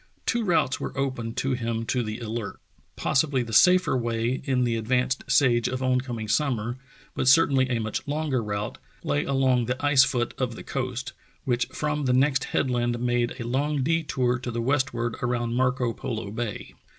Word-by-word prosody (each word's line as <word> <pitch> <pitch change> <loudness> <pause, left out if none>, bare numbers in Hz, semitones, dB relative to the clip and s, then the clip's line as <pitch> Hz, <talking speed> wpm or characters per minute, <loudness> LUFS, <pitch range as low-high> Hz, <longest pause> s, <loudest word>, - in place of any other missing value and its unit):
Two 235 -1 +1
routes 170 -9 +1
were - - -5
open 130 -4 -2
to 135 - -1
him 115 -2 -2
to 125 +2 0
the 110 -1 -4
Alert. 115 -2 -5 0.4
Possibly 135 -2 +1
the 115 -1 -8
safer 180 -2 +5
way 120 +1 -1
in 130 -2 +1
the 120 -1 +1
advanced 125 +3 0
stage 120 -4 +3
of 130 +1 -3
oncoming 125 -3 -1
sum 140 +3 +2
mer, 115 +3 -4 0.4
but - - -1
certainly 135 -2 +5
a 120 - +1
much 110 +3 -3
longer 145 -3 -1
route, 105 0 -4 0.2
lay 75 0 0
along 130 -3 +2
the 125 +3 -2
ice 140 -2 +6
foot 120 -3 -1
of 125 -3 -1
the - - -9
coast, 130 -2 -4 0.3
which 120 -2 +1
from 150 -1 -2
the 125 - +2
next 135 +2 +2
headland 120 -2 0
made 120 +1 -1
a - - -3
long 140 +3 0
detour 135 -5 0
to 125 - -5
the 120 0 -3
westward 120 -2 0
around 120 -1 -1
Marco 125 -1 +1
Polo 110 -4 -5
Bay. 115 -1 -5
125 Hz, 180 wpm, -26 LUFS, 120-135 Hz, 0.4 s, ice